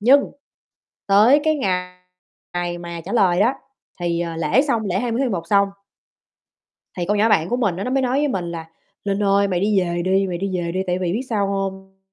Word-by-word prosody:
Nhưng 270 +6 +4 0.8
tới 220 +9 +6
cái 310 -1 +2
ngày 180 -6 -2 0.6
ngày 175 0 -2
mà 170 -1 -7
trả - - -6
lời 190 -5 +3
đó, 240 +6 +3 0.5
thì, 170 -1 -1
ờ, 170 -1 -3
lễ 165 - +2
xong, 235 -7 0
lễ 185 -1 0
20 240 0 -1
tháng 265 -3 +1
11 170 -5 -3
xong. 200 0 +4 1.3
Thì 175 - -1
con 205 - +1
nhỏ 220 +2 +3
bạn 165 -5 +2
của 245 - 0
mình 205 -8 0
á 195 - -3
nó 250 - -3
mới 270 0 +2
nói 255 +1 0
với 295 - +2
mình 190 -10 -2
là 165 -1 -6 0.4
"Linh 200 0 -1
ơi, 200 0 +3
mày 180 -3 0
đi 205 0 +2
về 175 -1 -1
đi, 190 +1 +2
mày 175 -2 -3
đi 195 +2 -3
về 170 -1 -2
đi, 185 +1 -1
tại 180 +1 0
vì 180 -2 -1
biết 230 - -1
sao 205 -4 0
hông? 190 -1 -4
195 Hz, 230 wpm, -21 LUFS, 175-225 Hz, 1.3 s, tới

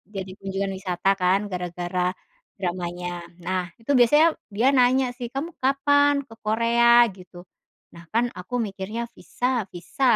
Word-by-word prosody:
jadi 190 -1 -4
kunjungan 195 0 -3
wisata 185 0 -1
kan 185 +2 +3
gara-gara 180 0 -2 0.5
dramanya. 175 -1 -3 0.4
Nah, 185 0 0 0.2
itu 230 - -3
biasanya 295 +7 +6 0.2
dia 225 +6 +1
nanya 255 +1 +4
sih, 245 - -4
“Kamu 310 +5 -5
kapan 285 +2 +4
ke 225 - -13
Korea?” 235 +2 +5
gitu. 180 -1 -14 0.5
Nah, 170 - -12
kan 235 +2 +2
aku 180 +7 -11
mikirnya 195 +4 -5
visa 250 -2 -2
visa, 235 - +1
210 Hz, 135 wpm, -24 LUFS, 180-245 Hz, 0.5 s, biasanya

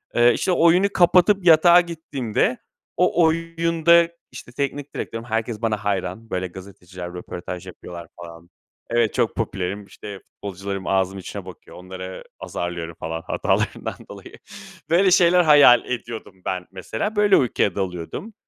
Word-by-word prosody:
Eee, 120 0 +5
işte, 185 - -1
oyunu 175 +3 +4
kapatıp 180 +2 +4
yatağa 170 +1 +7
gittiğimde 140 -9 -2 0.4
o 180 -1 +3
oyunda, 165 +1 +3 0.2
işte, - - -11
teknik 140 +2 -4
direktörüm, 115 0 -5
herkes 115 -1 -3
bana 110 -2 0
hayran. 100 +2 -3
Böyle, 95 -2 -2
gazeteciler 90 -1 -10
röportaj 90 +1 -7
yapıyorlar 85 -1 -10
falan 85 0 -12 0.4
Evet, 120 -2 +2
çok 120 -3 0
popülerim, 100 -2 -3
işte, 100 0 -10
futbolcularım 100 0 -7
ağzımın 95 0 0
içine 90 - -8
bakıyor. - - -12
Onları 95 +1 -8 0.2
azarlıyorum 85 -1 -5
falan 80 +1 -4
hatalarından 85 - -1
dolayı. - - -11 0.6
Böyle 185 +3 +4
şeyler 180 0 +5
hayal 145 -6 +7
ediyordum 115 -6 -6
ben 90 -1 -3
mesela. 110 - -4
Böyle 205 -1 +5
uykuya 110 -6 +1
dalıyordum, 95 - -5
110 Hz, 135 wpm, -22 LUFS, -, 0.6 s, yatağa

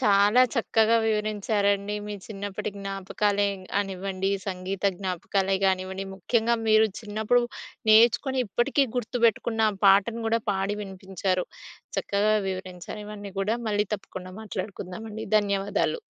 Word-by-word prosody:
చాలా 205 +1 +5
చక్కగా 225 -1 +3
వివరించారండి. 210 -1 0
మీ 210 - -4
చిన్నప్పటి 205 0 -5
జ్ఞాపకాలే 200 +1 0 0.3
గానివ్వండి, 195 -1 -1 0.2
సంగీత 190 0 -4 0.2
జ్ఞాపకాలే 190 +1 0
గానివ్వండి. 190 0 -1
ముఖ్యంగా 230 +5 +1
మీరు 215 0 +6
చిన్నప్పుడు 220 +3 +1 0.5
నేర్చుకుని 235 +4 +5
ఇప్పటికీ 240 +7 +2
గుర్తుపెట్టుకున్న 230 -2 +2 0.2
పాటను 205 +4 +4
గూడా 230 +1 +2
పాడి 195 +1 -1
వినిపించారు. 190 -1 -2 0.5
చక్కగా 205 +2 +2
వివరించారు. 185 +1 -6
ఇవన్నీ 205 -1 -8
గూడా 210 +4 +1
మళ్ళీ 210 0 +1
తప్పకుండా 185 -2 -8
మాట్లాడుకుందామండి. 210 +2 -6
ధన్యవాదాలు. 200 - 0
205 Hz, 105 wpm, -26 LUFS, 195-220 Hz, 0.5 s, మీరు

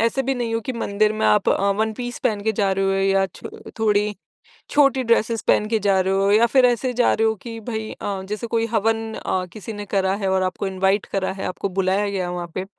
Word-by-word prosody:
ऐसे 230 +4 +1
भी 270 +1 -1
नहीं 235 -2 -2
हो 225 - 0
कि 255 +3 -4
मंदिर 215 -2 0
में 215 0 0
आप 210 -2 +3
अ, 200 +1 +2
वन 220 +2 0
पीस 245 +1 -5
पहन 215 -5 +1
के 220 +1 +1
जा 195 -2 +1
रहे 195 0 0
हो 195 - +2
या 195 0 +2
छ - - -17 0.4
थोड़ी 210 -1 +2 0.6
छोटी 275 -2 +3
ड्रेसेस 230 -1 +1
पहन 210 - +4
के 225 - +1
जा 195 -1 +2
रहे 190 +1 +1
हो 195 +1 +2
या 225 +3 +5
फिर 255 +1 +4
ऐसे 245 +1 0
जा 245 0 +3
रहे 225 - +2
हो 220 - +2
कि 230 -1 -7
भई 220 -1 -5
अ, 195 -2 -4
जैसे 215 +2 -3
कोई 230 0 0
हवन 225 +1 0
अ, 185 -1 -2
किसी 215 +1 -7
ने 205 -1 -6
करा 190 -1 +2
है 195 - +1
और 190 0 +2
आपको 185 +1 -2
इनवाइट 190 +1 +1
करा 190 -1 -1
है, 195 - -6
आपको 185 +2 -3
बुलाया 195 +2 +1
गया 190 -2 -2
है 175 - -4
वहाँ 175 -1 -4
पे 185 - -3
210 Hz, 255 wpm, -22 LUFS, 195-225 Hz, 0.6 s, या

